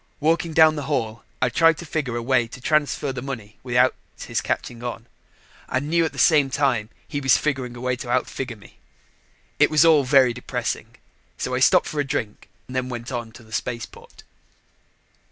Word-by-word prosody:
Walking 165 +2 +1
down 160 -1 +6
the 145 -2 -5
hall, 115 -6 -2 0.2
I 130 - +3
tried 165 +5 +4
to 170 - -8
figure 150 -6 -2
a 120 - -3
way 125 -1 +2
to 120 - -11
transfer 145 0 0
the 125 - -5
money 115 -6 -7
without 125 0 +3 0.2
his - - -3
catching 120 -1 -3
on 120 -1 -5 0.6
and 140 +4 -2
knew 170 0 +3
at - - -2
the - - -14
same 150 -5 +4
time 130 -6 0 0.2
he 145 - -3
was 135 -3 +5
figuring 130 -5 -2
a 120 - -9
way 125 0 0
to 120 - -7
outfigure 125 -1 -2
me. 100 - -18 0.8
It - - +5
was 155 +1 +5
all 155 -3 +6
very 130 -2 +4
depressing, 125 - -4 0.4
so - - -3
I - - +1
stopped - - +5
for 150 - -4
a - - +3
drink, 135 -7 -4 0.2
then 130 0 -3
went 120 +1 -6
on 120 -2 -4
to 120 - -13
the 110 0 -15
spaceport. 115 0 -6
130 Hz, 190 wpm, -23 LUFS, 120-145 Hz, 0.8 s, down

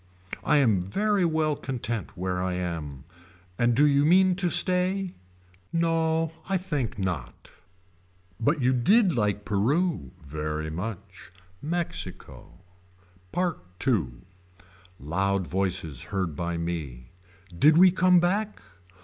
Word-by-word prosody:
I 150 - +3
am 110 -10 +3
very 200 - 0
well 155 -2 +1
content 120 -7 -4
where 90 0 -2
I 90 -1 -1
am. 80 -7 -5 0.6
And 120 0 +3
do 145 +4 +5
you 140 -1 +4
mean 185 +4 +5
to 185 -3 +1
stay. 185 +1 +1 0.6
No 165 -1 +1 0.2
I 195 - +2
think 150 - -3
not. 90 -10 -5 0.9
But 145 +7 +1
you 130 +1 +3
did 185 - +3
like 105 -3 0
Peru. 145 - 0 0.2
Very 75 +2 -4
much. 90 +3 -7 0.3
MEXICO 170 - -4 0.8
PART 180 - -1 0.3
II. 105 - +2 0.9
Loud 95 +6 -1
voices 90 -6 -1
heard 95 -6 -3
by 85 +2 -3
me. 75 -8 -5 0.4
Did 150 - +5
we 185 +1 +7
come 185 -1 +4
back. 205 +5 0
120 Hz, 115 wpm, -26 LUFS, -, 0.9 s, we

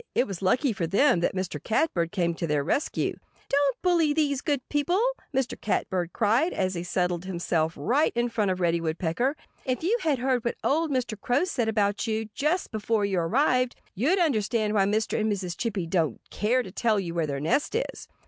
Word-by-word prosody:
It - - +3
was 195 -6 -6
lucky 250 +7 +2
for 170 -4 -2
them 195 - +4
that 175 - 0
Mr. 185 -5 -3
Catbird 185 - +1
came 175 -4 0
to 165 0 -3
their 150 -2 +1
rescue. 280 - -1 0.3
"Don't 280 -2 +1
bully 340 -5 +3
these 290 -3 +1
good 285 -5 -1
people!" 300 +6 +1 0.3
Mr. 265 -3 -2
Catbird 180 -4 -1
cried, 235 - +2
as 185 -1 0
he 170 - -3
settled 180 0 -1
himself 170 -3 -1
right 255 - +2
in 240 0 +1
front 215 -4 0
of 185 -1 -1
Reddy 170 -1 +1
Woodpecker. 170 - -1 0.3
"If 255 +2 -2
you 395 +8 +2
had 300 -4 +1
heard 250 -1 0
what 235 - -1
old 320 +3 +2
Mr. 245 -6 -2
Crow 250 +6 +2
said 250 -11 -1
about 205 0 0
you, 220 0 -2
just 310 - 0
before 215 -1 0
you 195 -3 0
arrived, 250 - +2 0.2
you'd 285 - +2
understand 220 - +1
why 200 -2 +3
Mr. 215 +3 0
and 215 0 +1
Mrs. 185 -4 -3
Chippy 205 -6 -2
don't 165 -7 0
care 245 +5 +1
to 190 - -9
tell 220 +1 +1
you 175 -3 -4
where 165 -2 0
their 140 -1 -3
nest 165 - 0
is." 485 - -3
215 Hz, 200 wpm, -26 LUFS, 180-270 Hz, 0.3 s, them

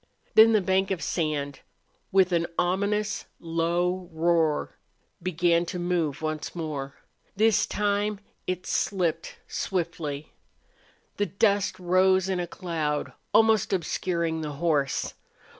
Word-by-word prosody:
Then 225 +1 +8
the 215 - +4
bank 190 +1 +1
of 190 -3 -2
sand, 145 -4 -2 0.5
with 190 -1 +4
an 170 -1 +1
ominous, 200 +4 0
low 175 +2 -1
roar, 160 -1 +1 0.5
began 170 -1 +2
to 180 - -4
move 170 -5 -1
once 155 +1 -3
more. 150 -5 -4 0.4
This 215 0 +3
time 205 0 0 0.3
it 185 0 -2
slipped 170 -4 -1
swiftly. 160 -5 -3 0.8
The 205 - +1
dust 200 -1 +1
rose 185 +1 +3
in 185 -2 0
a 175 - -2
cloud, 160 -5 -3 0.2
almost 220 -3 +4
obscuring 170 -2 -1
the 150 -1 -4
horse. 145 -3 0
175 Hz, 115 wpm, -27 LUFS, 160-190 Hz, 0.8 s, Then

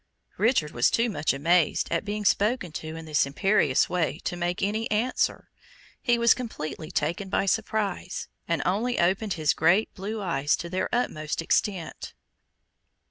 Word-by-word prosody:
Richard 215 - +2
was 120 - +3
too 230 0 +1
much 150 -5 0
amazed 165 +4 +2
at 170 - 0
being 210 0 -4
spoken 205 -2 +2
to 155 +1 -6
in 165 0 -8
this 150 -3 +2
imperious 145 -2 +2
way 165 -5 -1
to 180 - -2
make 175 +1 -2
any 215 +3 -1
answer. 225 +4 0 0.5
He 240 -2 +2
was 235 -1 +5
completely 160 -10 -6
taken 190 +3 -2
by 195 - +1
surprise, 205 -3 -1 0.2
and 170 -3 0
only 230 +7 0
opened 190 +4 +1
his 155 -3 +1
great 175 +7 +2
blue 210 +3 -5
eyes 150 -7 +1
to 170 - -7
their 185 0 -1
utmost 155 -11 -1
extent. 175 +1 -1
185 Hz, 155 wpm, -26 LUFS, 160-215 Hz, 0.5 s, was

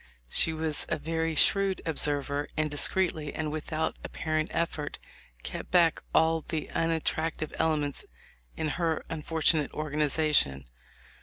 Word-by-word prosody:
She 160 - +2
was 160 -1 -2
a - - 0
very 165 0 -1
shrewd 195 +3 +3
observer, 145 -2 -1
and 155 -1 0
discreetly 155 0 0
and 155 -1 -2
without 155 +1 -2
apparent 155 -2 -2
effort 160 -3 -2 0.5
kept - - -6
back 170 -3 +4
all 160 0 +3
the 155 -1 -4
unattrac 165 -1 0
tive 155 - -4
elements 150 -3 +1 0.5
in 155 - -1
her 165 0 -1
unfortunate 160 -1 +1
organization. 150 - +3
155 Hz, 125 wpm, -29 LUFS, 150-165 Hz, 0.5 s, back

